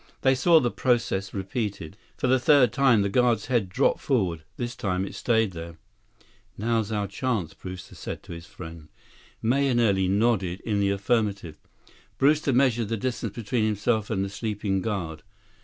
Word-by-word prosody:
They 130 - +4
saw 160 +5 +5
the 120 -5 0
process 115 -6 0
repeated. 100 -3 -4 0.2
For - - -2
the 130 +1 +4
third 130 -3 +5
time, 125 -6 +4
the - - +1
guard's 115 +1 +2
head 115 -7 0
dropped 130 +9 +2
forward. 95 - 0 0.2
This 120 0 -4
time, 95 -5 -1
it - - -8
stayed 110 -4 +1
there. 85 -1 -8 0.8
"Now's 110 0 0
our 105 -2 0
chance," 100 -3 -2
Brewster 90 0 -9
said - - -7
to - - -12
his 85 0 -9
friend. 80 -3 -10 0.5
Mahenili 120 -6 +2
nodded 100 -3 +1
in 105 -3 -1
the 100 0 +2
affirmative. 100 -5 -1 0.6
Brewster 145 +1 +3
measured 120 -3 +2
the 115 +1 -2
distance 115 -2 -3
between 115 0 -1
himself 110 +1 0
and 100 -3 0
the - - -5
sleeping 100 -2 -2
guard. 85 -8 -3
110 Hz, 160 wpm, -26 LUFS, 95-120 Hz, 0.8 s, saw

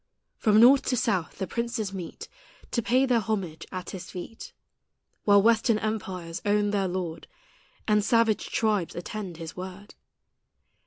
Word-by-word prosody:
From 215 -1 +4
north 260 +4 +8
to 250 - +1
south 200 -8 0
the 190 - -2
princes 235 0 -3
meet 180 -3 -7 0.4
To 235 - +1
pay 255 +4 +3
their 245 -3 +3
homage 190 -7 -3
at 185 -1 -5
His 185 -1 -8
feet, 185 +5 -8 0.7
While 200 -1 +6
western 230 0 +4
empires 190 -6 -4
own 205 0 +2
their 200 -2 +1
Lord, 175 -3 -4 0.6
And 210 -1 +3
savage 230 -1 +2
tribes 210 -6 0
attend 180 0 -6
His 165 -1 -7
word. 190 +2 -8
205 Hz, 145 wpm, -27 LUFS, 185-225 Hz, 0.7 s, north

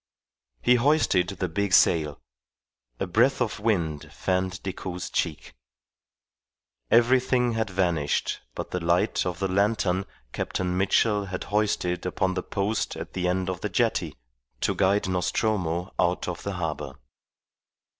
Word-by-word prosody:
He 125 - +5
hoisted 135 - +3
the 95 -1 -3
big 95 +3 -1
sail; 75 -5 +4 0.8
a - - 0
breath 115 +9 +3
of 120 -4 -1
wind 85 -9 -1
fanned 95 0 -1
Decoud's 90 -1 -5
cheek. 80 -4 -2 1.4
Everything 125 +1 +4
had 110 -2 -1
vanished 85 -6 0
but - - -5
the 90 - -1
light 85 +4 +1
of 90 -2 -3
the 95 - -1
lantern 100 -1 +1 0.3
Captain 90 -1 -2
Mitchell 100 +2 +2
had 90 -1 -5
hoisted 95 -4 +1
upon 95 +1 0
the 90 - -2
post 100 +4 -2
at - - -7
the 90 -1 -1
end 90 0 0
of 95 -2 -3
the - - -2
jetty - - 0 0.5
to - - +1
guide 100 +1 +2
Nostromo 90 -1 -1
out 90 +1 +1
of 90 -2 -4
the 100 - -4
harbour. 75 -6 -4
95 Hz, 135 wpm, -26 LUFS, 90-105 Hz, 1.4 s, He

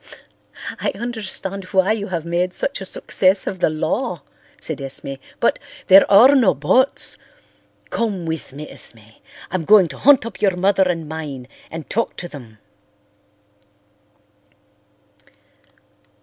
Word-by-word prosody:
"I - - 0
understand 200 -4 -4
why 190 +2 +2
you 215 -2 -2
have 170 -3 -4
made 175 +2 -1
such 280 -7 -3
a - - -5
success 190 +1 +1
of 190 - -4
the - - +3
law," 170 - -2 0.4
said 160 -3 -5
Esme, 135 0 -6 0.3
"but—" - - +2 0.3
"There 195 +1 +8
are 235 +8 +8
no 235 - +4
buts. 190 - +2 0.7
Come 205 -7 -2
with 160 -3 -4
me, 150 +3 -8
Esme. 110 -1 -11 0.3
I'm 185 -2 -2
going 200 0 +6
to 135 - -9
hunt 275 -4 +5
up 230 - -8
your 195 -3 +2
mother 190 0 +2
and 165 -3 -2
mine 150 -5 -6 0.2
and 165 -1 -8
talk 230 +2 -2
to 175 - -6
them." 120 -9 -12
185 Hz, 135 wpm, -20 LUFS, 155-205 Hz, 0.7 s, There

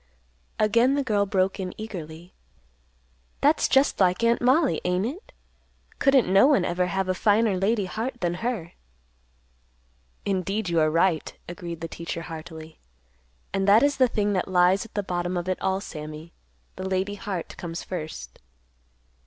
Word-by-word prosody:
_ - - -36 0.6
Again 235 +5 +3
the 285 - 0
girl 205 -5 +1
broke 195 -1 0
in 185 -1 -4
eagerly, 175 -5 -8 1.1
"That's 295 +3 +3
just 270 +1 +3
like 185 +2 +2
Aunt 235 0 +3
Mollie, 265 +4 +3
ain't 180 +2 0
it? 315 - -6 0.7
Couldn't 275 -4 +4
no 195 +7 +6
one 245 -12 +3
ever 180 +1 0
have 190 +1 -1
a 185 - +1
finer 210 +1 +2
lady 200 +2 +1
heart 230 +6 -4
than 175 -1 0
her." 225 -9 -3 1.5
"Indeed, 195 +1 -1
you 170 -1 +2
are 155 0 +3
right," 165 0 +1 0.2
agreed 170 -1 -7
the 165 - -3
teacher 170 0 -6
heartily. 160 -1 -9 0.7
"And 195 0 0
that 210 +5 +6
is 285 0 +2
the 260 -1 +5
thing 210 -3 0
that 185 - -1
lies 185 +3 +3
at 225 - -17
the 205 - 0
bottom 175 0 -2
of 175 +1 -3
it 185 - -2
all, 190 0 0
Sammy. 155 -3 -8 0.4
The 190 0 -4
lady 190 +2 -1
heart 195 -4 -5
comes 170 -1 -6
first." 155 - -7
190 Hz, 160 wpm, -25 LUFS, 175-220 Hz, 1.5 s, no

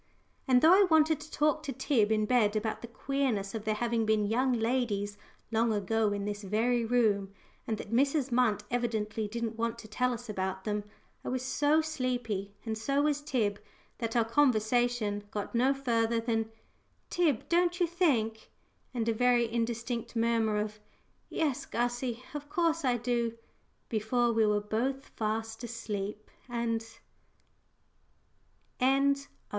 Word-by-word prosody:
And 255 0 +4
though 325 +3 +8
I 390 0 +6
wanted 315 -1 +4
to - - -10
talk 305 0 +1
to 300 -3 -4
Tib 240 -4 +1
in 215 -1 +2
bed 220 -3 +3
about 215 0 -2
the 235 - -7
queerness 235 -5 -1
of 220 -1 -5
there 215 0 +1
having 235 0 0
been 215 -1 +2
young 250 +5 +2
ladies 225 -4 0 0.4
long 225 +1 +2
ago 215 +1 +1
in 200 0 -2
this 205 0 -3
very 230 +4 +1
room, 220 -5 +2 0.4
and 220 - -1
that 210 +1 -7
Mrs. 275 +2 +2
Munt 235 -4 +2
evidently 220 -3 -1
didn't 230 +1 -4
want 230 0 -1
to 230 - -10
tell 250 +4 0
us 240 0 -6
about 190 -2 -3
them, 210 -1 -2 0.4
I - - -4
was 255 0 -2
so 290 +4 +3
sleepy, 245 -10 -2
and 220 -1 -2
so 275 +5 +1
was 295 -1 +1
Tib, 225 -9 0 0.4
that 230 -1 -3
our 230 -2 +4
conversation 230 -4 +2
got 205 -1 -5
no 250 +3 +3
further 235 -4 +1
than, 225 -1 -1 0.6
"Tib, 315 -10 +1
don't 350 +1 +2
you 355 - +4
think 260 -11 0 0.2
" - - -41
and 230 -2 -1
a 230 - +3
very 245 +1 +3
indistinct 235 0 -2
murmur 225 -2 +2
of 210 0 -3 0.5
"Yes, 285 -3 -1
Gussie, 245 +1 -2
of 295 0 -6
course 335 -4 +1
I 250 -2 +2
do," 235 -1 -1 0.5
before 235 +2 +1
we 220 -1 +3
were 210 0 +2
both 255 +6 -2
fast 225 +1 -3
asleep 215 -3 -5 0.2
and 235 -1 -1 2.0
CHAPTER 265 +1 +4 0.3
IV. - - -18
235 Hz, 160 wpm, -30 LUFS, 215-255 Hz, 2.0 s, though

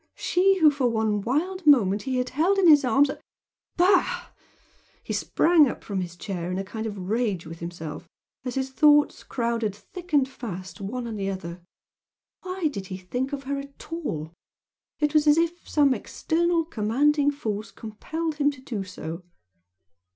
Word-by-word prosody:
she 385 +2 +3
who 315 -4 +6
for 270 -4 +1
one 220 -2 0
wild 325 - -2
moment 210 -8 +5
he 265 -1 -3
had 250 0 -1
held 335 +9 +2
in 380 -2 +4
his 295 -3 +7
arms 270 +3 +3 0.7
bah! 365 +2 +3 0.7
he - - -4
sprang 330 -4 +4
up - - -7
from 195 -3 -3
his 175 -1 -6
chair 180 -1 -4
in 180 - -2
a 195 - -2
kind 220 +3 -5
of 205 -2 -6
rage 200 -1 -1
with 165 +1 -9
himself, 165 -3 -7 0.4
as 250 -2 -4
his 265 0 -2
thoughts 295 +1 +4
crowded 230 -4 -2
thick 355 - -12
and 280 -3 +4
fast 190 -8 -8
one 240 +5 -4
on 225 -2 -5
the 195 -1 -2
other 180 -2 -6 0.8
why 370 -2 -2
did 200 -10 -5
he 185 - -5
think 245 +9 -3
of 280 -1 -4
her 280 +1 -2
at 280 +3 -10
all! 160 - -4 0.6
It 295 0 0
was 305 0 +3
as 295 +1 +6
if 335 +1 -1
some 285 -3 +4
external 335 +4 0
commanding 285 +4 +2
force 215 -7 -4
compelled 310 +9 -5
him 290 -1 +3
to 280 -3 -8
do 225 -6 -4
so. 175 -2 -7
255 Hz, 175 wpm, -25 LUFS, 200-300 Hz, 0.8 s, his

